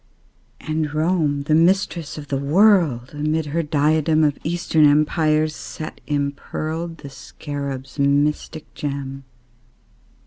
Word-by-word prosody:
And 155 -1 -2
Rome, 155 -3 +1
the 155 - 0
Mistress 170 -1 +2
of 145 -2 -9
the 135 - -1
World, 155 - +3
Amid 155 +2 -1
her 155 +3 -1
diadem 155 +1 +2
Of 145 -2 +1
Eastern 165 -1 +1
Empires 155 +1 +3
set 155 0 -8
impearled 155 +3 -3
The 140 - -10
Scarab's 135 0 -7
mystic 145 +2 0
gem. 135 -2 -5
150 Hz, 110 wpm, -21 LUFS, 140-160 Hz, -, World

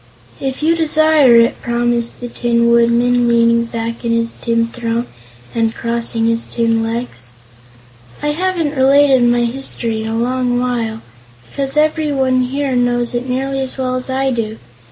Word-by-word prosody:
"If 270 +2 -4
you 330 +2 +3
desire 310 -5 +4
it," 230 0 +3
promised 235 0 -1
the 245 - -4
Tin 235 0 +1
Woodman, 240 +1 +3
leaning 235 0 +3
back 230 0 -5
in 235 - -1
his 230 0 0
tin 230 -1 0
throne 235 0 -3 0.5
and 225 -1 0
crossing 230 -1 -1
his 230 0 0
tin 230 -1 0
legs. 225 - -5 0.9
"I 295 - -2
haven't 330 -2 -1
related 270 0 +4
my 240 0 +2
history 235 -3 -3
in 220 - -5
a 225 - -2
long 245 +1 0
while, 230 -3 -2 0.4
because 275 - -3
everyone 290 -4 +1
here 270 +1 -2
knows 245 -1 0
it 245 +1 -3
nearly 270 +2 -2
as 265 0 -4
well 255 -1 -2
as 255 +1 -2
I 265 +1 0
do. 225 -2 -3
240 Hz, 155 wpm, -16 LUFS, 230-265 Hz, 0.9 s, desire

